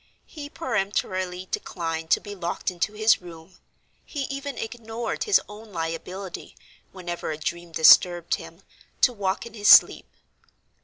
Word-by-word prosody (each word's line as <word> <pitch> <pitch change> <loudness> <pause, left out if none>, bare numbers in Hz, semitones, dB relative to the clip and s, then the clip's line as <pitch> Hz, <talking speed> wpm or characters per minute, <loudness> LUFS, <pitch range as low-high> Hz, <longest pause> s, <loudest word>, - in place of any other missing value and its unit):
He 290 -2 -9
peremptorily 185 -6 -2
declined 165 -1 -4
to - - +4
be 205 - -9
locked 175 -1 -3
into 180 +4 -2
his 215 -1 +3
room; 170 +1 -13 0.5
he 290 -3 -5
even 275 -1 -5
ignored 225 0 -4
his 420 -3 +5
own 210 +1 -12
liability, 175 +3 -6 0.4
whenever 175 -3 -6
a 155 - -3
dream 170 +2 -5
disturbed 175 +2 +5
him, - - -6 0.4
to 250 - +5
walk 195 -2 -2
in 235 - -11
his 205 -2 -2
sleep. - - +7
190 Hz, 140 wpm, -25 LUFS, 175-225 Hz, 0.5 s, sleep